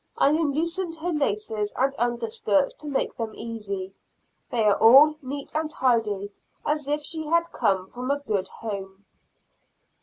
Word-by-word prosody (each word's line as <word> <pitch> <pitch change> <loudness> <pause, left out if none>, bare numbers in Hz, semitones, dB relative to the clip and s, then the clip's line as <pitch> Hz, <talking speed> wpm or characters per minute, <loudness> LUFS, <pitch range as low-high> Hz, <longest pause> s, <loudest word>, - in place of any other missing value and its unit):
I - - +5
unloosened 330 +3 0
her 335 +2 -3
laces 215 -7 -1
and 270 +2 +1
underskirts 235 0 +1
to 305 - -8
make 275 -2 -1
them 225 -3 -4
easy; 200 -4 -5 0.6
they 235 -2 0
are 210 -1 +5
all 275 +7 +8
neat 275 +1 -6
and 310 0 -1
tidy, 220 -8 0 0.3
as 295 -1 0
if 295 0 0
she 315 0 -3
had 335 +1 +2
come 190 -1 +1
from 250 +5 -6
a 280 - +2
good 210 -9 -2
home. 195 -2 -7
250 Hz, 150 wpm, -25 LUFS, 210-300 Hz, 0.6 s, all